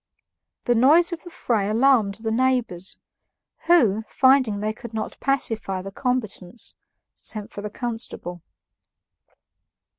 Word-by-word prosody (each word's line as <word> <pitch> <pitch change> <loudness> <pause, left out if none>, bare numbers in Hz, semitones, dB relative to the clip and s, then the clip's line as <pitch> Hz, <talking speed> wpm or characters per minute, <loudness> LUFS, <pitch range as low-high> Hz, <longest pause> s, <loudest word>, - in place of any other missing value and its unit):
The 240 - +2
noise 305 +9 +5
of 330 - -6
the 350 - -10
fray 220 - -1
alarmed 225 -3 +3
the 220 - -1
neighbors, 235 -7 0 0.7
who, 230 - +4
finding 260 -6 +3
they 215 +1 -1
could 230 0 -10
not 220 - -3
pacify 225 -8 0
the 195 - -7
combatants, 235 -4 -2 0.4
sent 215 -2 -5
for 205 - -7
the 210 - -4
constable. 225 -6 -5
225 Hz, 120 wpm, -24 LUFS, 205-260 Hz, 0.7 s, noise